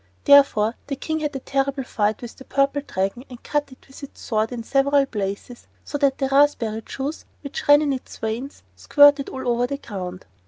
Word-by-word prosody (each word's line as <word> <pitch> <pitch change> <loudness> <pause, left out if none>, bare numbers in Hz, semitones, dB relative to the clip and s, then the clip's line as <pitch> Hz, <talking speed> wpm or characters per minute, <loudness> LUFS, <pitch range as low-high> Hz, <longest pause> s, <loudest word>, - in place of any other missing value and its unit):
Therefore 275 -7 +5
the 280 - -3
King 315 +3 -3
had 300 -2 -3
a - - -2
terrible 275 0 -1
fight 215 -1 -1
with 235 - -8
the 265 - -13
Purple 275 +2 0
Dragon 195 -1 -3
and 245 -2 -12
cut 295 -2 -2
it 260 - -17
with 270 - -14
his 280 - -8
sword 220 0 -2
in 240 -2 -5
several 275 +3 +2
places, 205 +1 -5 0.2
so 290 - -4
that 275 -2 +2
the 270 - 0
raspberry 270 -6 +2
juice 275 +7 -5 0.2
which 280 -2 -6
ran 290 +1 +7
in 285 -2 0
its 260 - -8
veins 230 +6 -5
squirted 290 -1 +5
all 260 -1 -6
over 240 0 +1
the 280 - -4
ground. 185 -7 -7
270 Hz, 200 wpm, -22 LUFS, 230-280 Hz, 0.2 s, ran